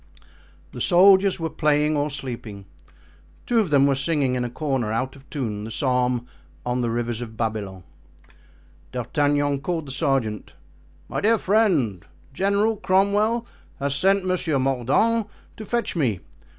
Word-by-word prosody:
The -, -, -7 dB
soldiers 190 Hz, +1 st, +5 dB
were 165 Hz, -1 st, -3 dB
playing 150 Hz, 0 st, +2 dB
or 145 Hz, +1 st, 0 dB
sleeping; 120 Hz, -8 st, -6 dB, 0.8 s
two 240 Hz, -2 st, +2 dB
of 205 Hz, -6 st, +1 dB
them 140 Hz, -2 st, +4 dB
were 140 Hz, -, +3 dB
singing 135 Hz, -1 st, 0 dB
in 125 Hz, -1 st, -1 dB
a 120 Hz, -, -3 dB
corner, 130 Hz, -4 st, -2 dB
out 130 Hz, +4 st, -2 dB
of 140 Hz, 0 st, -18 dB
tune, 110 Hz, -8 st, -4 dB
the 110 Hz, -, -6 dB
psalm: 125 Hz, 0 st, 0 dB, 0.4 s
"On 125 Hz, 0 st, -1 dB
the 120 Hz, -, 0 dB
rivers 120 Hz, 0 st, -2 dB
of 110 Hz, -2 st, -8 dB
Babylon." 105 Hz, -5 st, -3 dB, 1.1 s
D'Artagnan 145 Hz, +3 st, 0 dB
called 165 Hz, +1 st, -2 dB
the 135 Hz, -, -8 dB
sergeant. 130 Hz, -6 st, -1 dB, 0.5 s
"My -, -, -3 dB
dear 225 Hz, +2 st, +4 dB
friend, 180 Hz, -, +1 dB, 0.3 s
General 200 Hz, +6 st, +1 dB
Cromwell 205 Hz, +5 st, +2 dB, 0.3 s
has 140 Hz, 0 st, -1 dB
sent 190 Hz, +6 st, +2 dB
Monsieur 175 Hz, -5 st, 0 dB
Mordaunt 135 Hz, -, +1 dB, 0.3 s
to 215 Hz, -, -7 dB
fetch 235 Hz, 0 st, -2 dB
me. 120 Hz, -, 0 dB
140 Hz, 145 wpm, -23 LUFS, 120-185 Hz, 1.1 s, soldiers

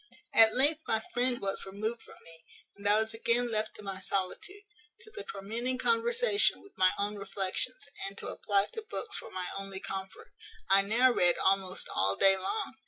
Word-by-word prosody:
"At 220 Hz, -1 st, +6 dB
length 295 Hz, +5 st, +6 dB
my 220 Hz, -, +1 dB
friend 245 Hz, 0 st, +1 dB
was 195 Hz, 0 st, -3 dB
removed 215 Hz, +4 st, -4 dB
from -, -, -15 dB
me, 165 Hz, 0 st, -15 dB, 0.3 s
and 205 Hz, 0 st, -2 dB
I 210 Hz, +1 st, +4 dB
was 220 Hz, 0 st, -2 dB
again 235 Hz, +1 st, +1 dB
left 215 Hz, 0 st, 0 dB
to 210 Hz, -, -10 dB
my 195 Hz, -1 st, -6 dB
solitude, 195 Hz, -, -3 dB, 0.4 s
to 435 Hz, -, -16 dB
the 415 Hz, -3 st, -8 dB
tormenting 230 Hz, +6 st, -4 dB
conversation 465 Hz, -, +2 dB
with 400 Hz, -, -19 dB
my 185 Hz, 0 st, +4 dB
own 205 Hz, +1 st, -2 dB
reflections, 200 Hz, -, -2 dB, 0.2 s
and 195 Hz, +1 st, -9 dB
to -, -, -5 dB
apply 200 Hz, -1 st, 0 dB
to 445 Hz, -, -5 dB
books -, -, -4 dB
for -, -, -7 dB
my 185 Hz, -1 st, -5 dB
only 195 Hz, -1 st, -4 dB
comfort. 190 Hz, 0 st, -8 dB, 0.4 s
I 195 Hz, 0 st, +7 dB
now 235 Hz, +6 st, +3 dB
read 175 Hz, -7 st, +2 dB
almost 190 Hz, -1 st, 0 dB
all 100 Hz, +1 st, +2 dB
day 195 Hz, -, +7 dB
long. 265 Hz, -, -4 dB
210 Hz, 185 wpm, -30 LUFS, 195-255 Hz, 0.4 s, I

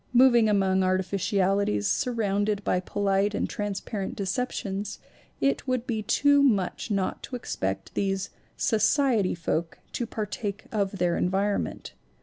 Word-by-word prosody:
Moving 240 Hz, -3 st, +6 dB
among 190 Hz, -2 st, +2 dB
artificiali 190 Hz, +1 st, +1 dB
ties, 105 Hz, -1 st, 0 dB
surrounded 205 Hz, -3 st, 0 dB
by 180 Hz, -, +1 dB
polite 200 Hz, +2 st, 0 dB
and -, -, 0 dB
transparent 205 Hz, -1 st, -4 dB
deceptions, 200 Hz, -1 st, -3 dB, 0.4 s
it 275 Hz, 0 st, 0 dB
would 255 Hz, -2 st, 0 dB
be 225 Hz, -3 st, -2 dB
too 285 Hz, +6 st, +4 dB
much 215 Hz, -6 st, +1 dB
not 195 Hz, -3 st, -1 dB
to 255 Hz, -, -6 dB
expect 95 Hz, -, -3 dB
these 195 Hz, 0 st, -1 dB, 0.3 s
"society" 220 Hz, -2 st, +2 dB
folk 165 Hz, -1 st, -2 dB
to 240 Hz, -, -3 dB
partake 210 Hz, -1 st, -4 dB
of 200 Hz, -2 st, -1 dB
their 175 Hz, -2 st, +1 dB
environment. 195 Hz, +3 st, -1 dB
200 Hz, 130 wpm, -27 LUFS, 190-220 Hz, 0.4 s, Moving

